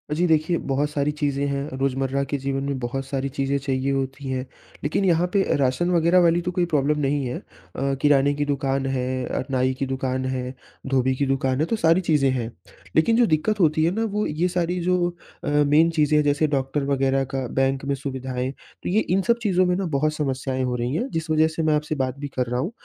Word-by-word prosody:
जी 175 - +2
देखिए, 160 +2 +2
बहुत 145 +2 -1
सारी 150 0 0
चीज़ें 145 -1 -1
हैं, 140 +1 -2
रोज़मर्रा 135 0 0
के 140 +1 -2
जीवन 135 0 -2
में 140 -1 -2
बहुत 130 +2 -3
सारी 135 0 -2
चीज़ें 135 +1 -1
चाहिए 135 0 -1
होती 135 0 -3
हैं। 130 0 -2 0.4
लेकिन 155 +7 0
यहाँ 175 0 +3
पे 200 - +4
अ, - - 0
राशन 135 +6 +1
वगैरह 170 +1 +4
वाली 170 +1 +3
तो 180 - -2
कोई 175 -1 +1
प्रॉब्लम 150 -2 +1
नहीं 140 -1 0
है। 125 - -3
अ, - - -17 0.6
किराने 145 -1 +4
की 145 0 -1
दुकान 135 -1 -1
है 130 -1 -1
अ, - - -2
नाई 130 0 +1
की 135 - 0
दुकान 130 0 -2
है, 130 0 -3 0.3
धोबी 130 -1 +1
की 140 - 0
दुकान 135 0 0
है, 155 - +2
तो 225 - -1
सारी 165 -2 +3
चीज़ें 150 -5 +2
हैं। 120 -3 -2 0.4
लेकिन 225 +9 +4
जो 245 - +5
दिक्कत 200 +7 +1
होती 155 -2 +3
है 170 - +2
ना, 225 - 0
वो 210 -1 -1
ये 160 +4 0
सारी 175 0 -1
जो 180 -1 +2 0.3
अ, 145 - -2
मेन 150 +3 +4
चीज़ें 150 0 +3
हैं, 150 - +4
जैसे 145 +2 +2
डॉक्टर 135 +2 -1
वगैरह 135 0 +1
का, 135 -1 -1
बैंक 135 +2 0
में 140 0 0
सुविधाएँ। 130 -1 -4
तो - - -10
ये 210 +4 +3
इन 190 +2 +3
सब 235 0 +4
चीज़ों 185 -3 +3
में 180 - +1
ना 190 0 -1
बहुत 155 +2 +1
समस्याएँ 130 -3 -2
हो 125 -1 -1
रही 120 +2 -2
हैं, 245 +10 -1
जिस 165 0 -3
वजह 155 0 +4
से 165 - 0
मैं 155 -1 +3
आपसे 150 +1 -2
बात 130 -1 -2
भी 145 - -4
कर 125 - +2
रहा 125 +1 -1
हूँ। 170 - -2
140 Hz, 235 wpm, -23 LUFS, 135-160 Hz, 0.6 s, जो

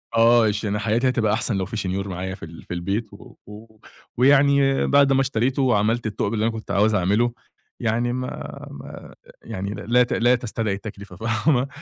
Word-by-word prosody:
آه، 115 0 +5
عشان 105 0 -1
حياتي 115 +4 +1
هتبقى 110 -4 +1
أحسن 120 -1 0
لو 95 - -1
في 110 - -6
شنيور 95 0 -2
معايا 95 0 -4
في - - -14
ال 80 +1 -12
في - - -7
البيت 100 +5 -3
و 100 - -14
و 110 +1 -13 0.4
ويعني 140 +1 +4
بَعد 140 -1 +4
ما 135 - +3
اشتريته 130 +1 0
وعمَلت 115 -2 +1
الثُقب 105 0 -2
اللي 110 -1 -1
أنا 115 - +1
كنت 110 -1 -7
عاوز 105 +2 +3
أعمله، 105 +6 +1 0.5
يعني 120 +2 0
ما 125 0 -3 0.4
ما - - -10 0.3
يعني 100 +2 -5
لا 120 +6 +2
ت 120 - -3
لا 120 +2 +3
تستدعي 115 -4 -2
التكلفة 100 -2 -9
فاهمة، 120 - +1
110 Hz, 185 wpm, -23 LUFS, 100-120 Hz, 0.5 s, آه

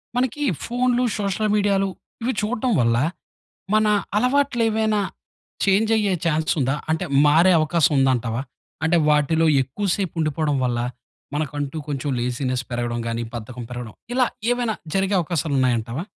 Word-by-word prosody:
మనకి 255 +4 0 0.2
ఫోన్‌లు, 245 +1 +1 0.2
సోషల్ 205 +2 0
మీడియాలు 200 -1 +2 0.3
ఇవి 255 - 0
చూడటం 235 +3 -1
వల్ల 115 -1 +3 0.8
మన 215 0 +4 0.3
అలవాట్లేవైనా 225 -4 +2 0.7
చేంజ్ 205 +3 +3
అయ్యే 205 -3 +1
ఛాన్స్ 155 -1 +1
ఉందా? 135 +1 +1 0.2
అంటే 160 +3 0 0.2
మారే 165 +5 +5
అవకాశం 155 -1 +2
ఉందంటావా? 125 -3 +1 0.4
అంటే 165 +2 +3
వాటిలో 150 +2 +3 0.2
ఎక్కువసేపు 190 +6 -2
ఉండిపోవడం 155 -1 0
వల్ల, 120 -1 -1 0.6
మనకంటూ 145 0 -3
కొంచెం 145 0 -3
లేజీనెస్ 125 +1 -1
పెరగడం 120 0 -2
గానీ, 115 0 -2
బద్ధకం 120 +2 -7
పెరగడం 120 -3 -6 0.2
ఇలా 255 -1 +4 0.3
ఏవైనా 240 -3 0 0.2
జరిగే 195 +1 +1
అవకాశాలున్నాయంటావా? 135 -5 0
160 Hz, 120 wpm, -22 LUFS, 130-215 Hz, 0.8 s, మారే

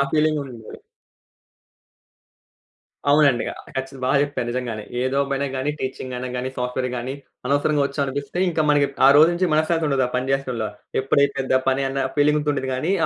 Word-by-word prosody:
ఆ - - +5
ఫీలింగ్ 155 0 +2
గూడ 140 -1 -5
ఉండాలి. 110 -2 -11 2.3
అవునండి. 145 -4 +4
ఆహ్, - - -12
కచ్చితం 135 0 -4
బా 130 - 0
జెప్పారు 140 -4 -2
నిజంగానే. 120 -3 -3 0.2
ఏ - - 0
జాబ్ 140 0 +1
అయినా 140 +1 -1
గాని, 130 +2 -1
టీచింగ్ 130 -1 -5
అయిన 125 +1 -4
గాని, 125 +1 -2
సాఫ్ట్‌వేర్ 125 +1 -2
గాని, 125 +2 -4 0.3
అనవసరంగా 145 +2 +2
ఒచ్చామనిపిస్తే 140 +1 -3
ఇంకా 160 -2 0
మనకి 145 -1 +4 0.2
ఆ - - +9
రోజు 155 +3 +7
నుంచి 175 -1 0
మనశ్శాంతి 160 +1 +2
ఉండదు 135 -2 +2
ఆ - - -8
పని 130 +1 -1
చేసటం‌లో. 125 -5 -2 0.3
ఎప్పుడైపోద్దా 135 -1 +2
పని 135 +1 +1
అన్న 135 0 -1
ఫీలింగ్‌తో 150 0 +3
ఉంటది 135 -2 -3
గాని, 155 +8 -1
135 Hz, 170 wpm, -22 LUFS, 130-145 Hz, 2.3 s, ఆ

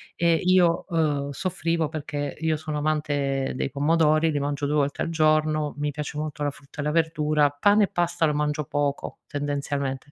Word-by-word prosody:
E 170 -1 +3
io, 175 0 +3
uhm, 145 -4 0
soffrivo 165 -2 -1
perché 145 -2 -4
io 160 0 +1
sono 155 0 -4
amante 145 -3 -1
dei 135 - -2
pomodori, 155 +2 +3
li 145 - -1
mangio 145 0 -2
2 150 - 0
volte 145 -1 0
al - - -1
giorno. 155 -2 +2
Mi 145 0 -1
piace 150 0 -5
molto 150 -2 -4
la 145 - 0
frutta 140 +2 -16
e - - -1
la 150 - 0
verdura, 155 -2 +2
pane 205 +9 +3
e - - -9
pasta 175 -1 0
lo 150 - +1
mangio 150 0 -1
poco 145 -1 -2
tendenzialmente, 145 -1 -3
150 Hz, 185 wpm, -25 LUFS, 145-160 Hz, -, E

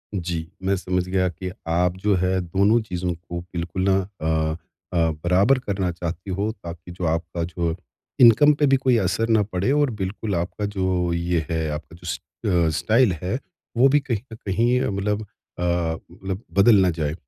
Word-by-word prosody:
जी, 85 -3 -3 0.2
मैं 100 +1 +2
समझ 90 -1 -1
गया 95 0 +1
कि 90 +2 -6 0.2
आप 90 +2 +1
जो 100 +1 +2
है 95 0 +1
दोनों 100 +6 +3
चीज़ों 90 -4 -3
को 85 +1 -7
बिल्कुल 85 +1 -4
ना 95 - +4 0.3
अ 80 0 0 0.4
अ, - - 0 0.3
बराबर 100 +10 +4
करना 95 -6 -2
चाहती 85 +3 -5
हो 105 +2 0
ताकि 85 -3 -10
जो 90 +1 -7
आपका 85 +1 -1
जो 85 -1 -2 0.5
इनकम 120 +6 +8
पे 145 0 +2
भी 135 0 +5
कोई 130 -2 +2
असर 100 +4 0
ना 110 -2 +4
पड़े 100 +5 -1
और 145 -2 +3
बिल्कुल 95 +1 -2
आपका 90 +4 -2
जो 95 -3 0
ये 85 -2 0
है, 80 -1 -1
आपका 75 +2 -7
जो - - -10
स - - -2 0.6
स्टाइल 110 +5 +3
है 95 +9 -2 0.4
वो 130 +3 +7
भी 145 +2 +4
कहीं 125 -5 -2 0.2
न - - -6
कहीं 120 +6 +2
मतलब 105 -1 -1
अ, - - -7 0.4
मतलब 85 +3 -2 0.2
बदल 110 +3 +7
ना 90 - +4
जाएँ। 80 -3 -2
90 Hz, 180 wpm, -23 LUFS, 85-105 Hz, 0.6 s, इनकम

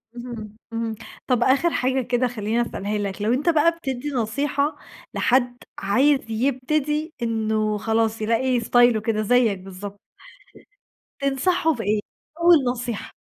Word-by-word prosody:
اهم، 235 -4 -8 0.2
اهم، 230 -1 -2 0.3
طَب 245 -2 +2
آخر 275 +7 +3
حاجة 260 +1 +1
كده 245 +1 0
خلّيني 225 0 -1
أسألها 210 -3 -3
لك، 200 0 -4
لو 220 +3 +2
أنت 290 +7 +1
بقى 325 +1 +4
بتدي 275 -4 -4
نصيحة 280 +4 -1 0.4
لحد 245 -1 +2 0.2
عايز 265 +9 +3
يبتدي 280 +6 -1
إنّه 220 -2 0
خلاص 225 +1 0
يلاقي 240 +3 +1
ستايله 240 -1 +4
كده 220 0 0
زيك 225 -2 +2
بالضبط. 195 +2 -9 1.2
تنصحه 275 +4 +1
بإيه 215 -4 -1 0.4
أول 345 0 +7 0.2
نصيحة؟ 240 -3 -5
240 Hz, 125 wpm, -23 LUFS, 220-270 Hz, 1.2 s, أول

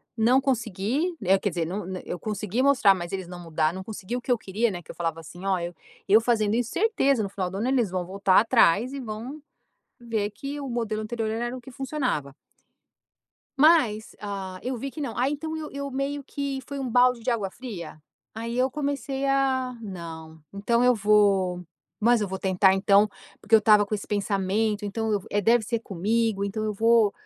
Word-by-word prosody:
não 235 +3 +4
consegui, 255 - -1
é 195 +1 +4
quer 205 - 0
dizer 170 -2 -2
não 180 +3 -4 0.2
eu 180 - -5
consegui 210 +3 -2
mostrar, 265 -7 +5
mas 175 -2 -6
eles 190 -2 -4
não 180 0 -9
mudaram, 160 +1 0
não 190 - -6
consegui 215 +2 -6
o 250 - -3
que 250 - -3
eu 245 - +4
queria, 220 +3 -1
né, 180 -4 -5
que - - -10
eu - - -14
falava 165 -1 -2
assim: 175 +4 -11
"Olha, 180 -3 -1 0.3
eu 215 +3 +6
fazendo 220 -3 +1
isso 240 0 -1
certeza 280 - +2
no 200 - -3
final 190 -2 -3
do 190 - -6
ano 220 +5 -1
eles 255 -6 +2
vão 180 -1 -2
voltar 190 0 +3
atrás, 230 +1 +3
e 280 - -4
vão, 245 +5 -6 0.6
ver 220 -3 -2
que 275 +8 -6
o 280 - -5
modelo 225 -3 -2
anterior 225 0 -3
era 240 +3 -2
o - - -10
que 265 - -12
funcionava". 255 - -2 1.3
Mas, 270 -9 +4
ah, 195 -2 -5
eu 255 +1 -3
vi 275 +4 -5
que 305 - -9
não, 265 -6 -4
aí 260 +4 +2
então 315 +2 -4
eu 310 -1 -6
eu 280 0 -5
meio 275 +2 -2
que 280 -1 -4
foi 280 - -6
um 265 -2 -3
balde 245 0 +4
de 240 +3 -1
água 210 -5 -1
fria, 195 -10 -8 0.3
aí 230 +2 -4
eu 255 +1 +2
comecei 275 -1 -2
a, 265 -2 +1
não, 165 -5 -8
então 235 +4 +1
eu 250 0 +5
vou, 200 -4 +3 0.3
mas 235 +1 +3
eu 205 - -1
vou 190 +1 -4
tentar 190 0 +3
então, 200 +2 +4 0.3
porque 215 +2 +1
eu - - +10
estava 210 -1 +5
com 205 - -3
esse 205 - -5
pensamento 205 +1 0
então 220 +2 -2
eu, 205 -2 0
é 205 - +1
deve 230 +3 +3
ser 230 +1 -2
comigo 210 +1 0
então 215 +2 -3
eu 215 - -1
vou, 225 0 +4
220 Hz, 205 wpm, -26 LUFS, 195-250 Hz, 1.3 s, eu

